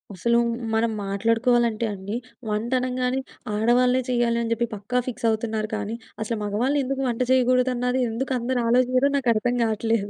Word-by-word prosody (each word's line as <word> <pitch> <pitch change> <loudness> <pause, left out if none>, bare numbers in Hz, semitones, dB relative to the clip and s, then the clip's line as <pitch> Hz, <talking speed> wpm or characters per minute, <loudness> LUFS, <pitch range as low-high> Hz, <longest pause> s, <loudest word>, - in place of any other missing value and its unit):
అసలు 235 +6 +2 0.4
మనం 225 +1 +2
మాట్లాడుకోవాలంటే 230 +3 +1
అండి. 200 +2 -5 0.3
వంట 215 +4 -2
అనంగానే 255 0 -1 0.4
ఆడవాళ్ళే 250 +4 +3
చేయాలి 240 -1 +1
అని 230 - -3
చెప్పి 235 +1 -1
పక్కా 210 +5 -1
ఫిక్స్ 250 -1 -2
అవుతున్నారు 220 -1 -1
కానీ! 210 +2 -3 0.3
అసలు 225 0 -3
మగవాళ్ళు 240 +8 0
ఎందుకు 270 +1 -2
వంట 235 +1 -2
చేయకూడదన్నది 250 0 +2
ఎందుకు 260 +4 -2
అందరూ 245 +1 -1
ఆలోచియరో 255 +3 +3
నాకర్థం 245 -1 +1
కాట్లేదు. 220 -1 0
235 Hz, 145 wpm, -24 LUFS, 220-250 Hz, 0.4 s, ఆడవాళ్ళే